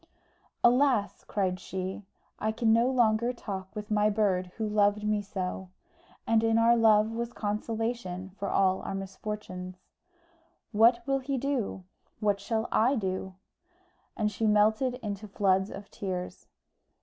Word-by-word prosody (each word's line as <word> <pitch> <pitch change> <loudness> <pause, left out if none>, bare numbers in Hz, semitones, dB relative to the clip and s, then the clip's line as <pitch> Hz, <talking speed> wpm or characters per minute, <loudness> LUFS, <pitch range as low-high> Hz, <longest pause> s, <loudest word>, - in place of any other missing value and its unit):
"Alas!" 245 -4 +3
cried 185 -3 -1
she, 190 +1 -5 0.4
"I 220 - 0
can 220 0 +2
no 235 +3 +4
longer 235 -2 +2
talk 195 -5 -6
with 210 0 -6
my 210 0 +3
bird 200 -4 +1
who 220 -1 -1
loved 210 0 +2
me 210 0 +1
so; 190 -2 -5 0.6
and 225 0 +3
our 230 +1 +5
love 220 -1 +4
was 235 +1 -4
consolation 210 -3 -3
for 200 - -2
all 190 -1 +2
our - - -4
misfortunes. 195 -1 -6 1.0
What 235 +2 +4
will 275 0 +1
he 270 +1 -2
do? 255 -8 -2 0.4
What 205 -2 +1
shall 220 +2 -2
I 245 +5 +3
do?" 190 -3 -3 0.8
And 210 -2 0
she 220 +2 -1
melted 215 +4 +3
into 210 0 -4
floods 190 -1 +1
of 200 - -9
tears. 185 -2 -5
210 Hz, 135 wpm, -29 LUFS, 195-230 Hz, 1.0 s, our